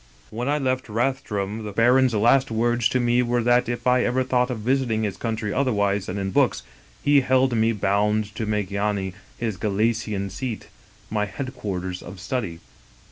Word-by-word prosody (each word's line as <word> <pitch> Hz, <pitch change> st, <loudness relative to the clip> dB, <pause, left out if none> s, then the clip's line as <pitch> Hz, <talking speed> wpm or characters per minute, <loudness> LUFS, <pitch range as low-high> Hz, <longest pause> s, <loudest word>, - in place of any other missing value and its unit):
" -, -, -29 dB
When 120 Hz, +5 st, -3 dB
I 145 Hz, -, +2 dB
left 130 Hz, -3 st, -1 dB
Rathdrum 110 Hz, -3 st, -2 dB
the 105 Hz, -, -5 dB
baron's 125 Hz, +3 st, +4 dB
last 120 Hz, +5 st, +4 dB
words 120 Hz, +1 st, +1 dB
to 125 Hz, -, +1 dB
me 120 Hz, 0 st, +3 dB
were 120 Hz, -1 st, 0 dB
that 120 Hz, 0 st, +3 dB
if 120 Hz, -, -4 dB
I 125 Hz, 0 st, +4 dB
ever 130 Hz, +2 st, +1 dB
thought 125 Hz, 0 st, +1 dB
of 125 Hz, -, -2 dB
visiting 120 Hz, -2 st, +1 dB
his 100 Hz, -3 st, -2 dB
country 110 Hz, 0 st, -3 dB
other 130 Hz, -1 st, +1 dB
wise 100 Hz, -2 st, 0 dB
than 95 Hz, -, -4 dB
in 95 Hz, -1 st, -2 dB
books, -, -, +2 dB, 0.4 s
he 145 Hz, -1 st, +5 dB
held 130 Hz, -1 st, +2 dB
me 110 Hz, 0 st, +3 dB
bound 105 Hz, +1 st, 0 dB
to 110 Hz, 0 st, -4 dB
make 105 Hz, -2 st, -1 dB
Yany, 100 Hz, -2 st, -1 dB, 0.2 s
his 110 Hz, -5 st, -3 dB
Galician 105 Hz, -1 st, -1 dB
seat, 115 Hz, +3 st, -5 dB, 0.4 s
my 105 Hz, -1 st, 0 dB
headquarters 95 Hz, -8 st, -5 dB
of 95 Hz, +2 st, -10 dB
study. 90 Hz, -8 st, -3 dB
115 Hz, 185 wpm, -24 LUFS, 100-125 Hz, 0.4 s, he